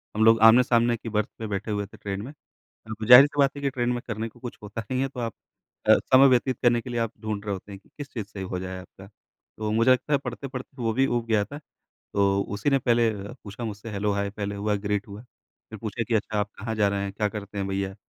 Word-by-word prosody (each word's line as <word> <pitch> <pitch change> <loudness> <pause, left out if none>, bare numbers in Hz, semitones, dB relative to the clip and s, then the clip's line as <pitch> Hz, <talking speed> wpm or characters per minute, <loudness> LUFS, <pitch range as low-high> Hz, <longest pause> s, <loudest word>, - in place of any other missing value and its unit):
हम 110 - +2
लोग 115 0 +6
आमने-सामने 120 0 +5
की 115 - -7
बर्थ 105 -1 0
पे 110 - -4
बैठे 100 +1 -3
हुए 105 -1 -1
थे 100 - -15
ट्रेन 100 -1 -4
में। 125 +6 -7
a, 110 -6 -11
ज़ाहिर-सी 135 +4 +8
बात 140 0 +3
है 140 - -7
कि 140 - +1
ट्रेन 125 -2 -1
में 120 - -3
करने 115 -1 -3
को 120 - -21
कुछ 120 0 -7
होता 105 +2 -6
नहीं 130 0 +1
है 135 - +1
तो 130 - -9
आप 115 -3 -3 0.5
अ, - - +8 0.2
समय 135 +1 +9
व्यतीत 130 0 +2
करने 120 -1 +4
के 125 - -9
लिए 120 -1 -2
आप 115 -1 -1
ढूँढ़ 105 -2 -3
रहे 100 - -1
होते 95 +2 -8
हैं 100 - -9
कि 100 - -28
किस 145 -2 -7
चीज़ 110 -5 -4
से 100 -1 -8
हो 95 -1 -4
जाए 95 0 -5
आपका। 95 +1 -14
तो 105 +1 -9
मुझे 115 +3 +4
लगता 130 +4 +2
है 140 - +5
पढ़ते-पढ़ते 130 +1 -6
वो 115 -1 +1
भी 135 +3 +2
ऊब 120 -2 -1
गया 110 -2 +2
था। 145 +5 -9 0.6
तो 100 0 +3
उसी 105 +8 0
ने 135 - +4
पहले 120 -2 +3 0.3
पूछा 105 +3 -7
मुझसे 110 +1 -6
हेलो, 105 0 -1
हाय 100 0 -1
पहले 100 0 -4
हुआ 105 +1 -1
ग्रीट 100 -1 -1
हुआ। 100 +2 -9 0.5
फिर 110 - -8
पूछे 110 +2 -3
कि 115 - -2
"अच्छा 110 0 0
आप 105 0 -1
कहाँ 115 +1 -3
जा 105 -2 +3
रहे 100 0 -1
हैं? 100 0 -4
क्या 105 +1 0
करते 105 0 -7
हैं 100 - -1
भैया?" 95 0 -2
110 Hz, 260 wpm, -26 LUFS, 100-120 Hz, 0.6 s, समय